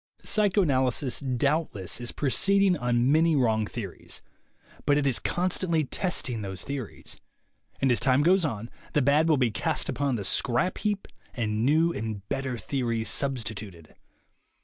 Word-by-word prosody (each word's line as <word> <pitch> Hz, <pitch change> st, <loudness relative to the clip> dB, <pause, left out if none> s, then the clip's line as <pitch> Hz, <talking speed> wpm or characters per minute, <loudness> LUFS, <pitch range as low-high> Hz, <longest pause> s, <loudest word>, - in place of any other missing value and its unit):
Psychoanalysis, 145 Hz, -, +1 dB
doubtless, 130 Hz, -, -1 dB
is 120 Hz, -, -4 dB
proceeding 195 Hz, +7 st, +2 dB
on 125 Hz, -2 st, +1 dB
many 160 Hz, +1 st, +4 dB
wrong 110 Hz, -5 st, +2 dB
theories; 100 Hz, -6 st, -8 dB, 0.6 s
but 145 Hz, 0 st, +4 dB
it 145 Hz, -, +1 dB
is 135 Hz, -4 st, +3 dB
constantly 175 Hz, -2 st, 0 dB
testing 130 Hz, -, -2 dB
those 95 Hz, -2 st, -5 dB
theories, 135 Hz, -5 st, -6 dB, 0.6 s
and 135 Hz, -, +2 dB
as 120 Hz, -, +3 dB
time 130 Hz, +3 st, +3 dB
goes 185 Hz, +3 st, +4 dB
on 115 Hz, -6 st, -3 dB, 0.2 s
the 150 Hz, -, +3 dB
bad 150 Hz, +4 st, +3 dB
will 155 Hz, -, +4 dB
be 125 Hz, -3 st, +2 dB
cast 100 Hz, -, -1 dB
upon 135 Hz, 0 st, 0 dB
the 105 Hz, -, -3 dB
scrap 120 Hz, -, 0 dB
heap 205 Hz, -2 st, -2 dB, 0.3 s
and 110 Hz, -2 st, -1 dB
new 160 Hz, +4 st, +3 dB
and 105 Hz, -2 st, -5 dB
better 135 Hz, -3 st, -2 dB
theories 115 Hz, -4 st, -2 dB
substituted. 110 Hz, -, -4 dB
130 Hz, 145 wpm, -27 LUFS, 115-155 Hz, 0.6 s, many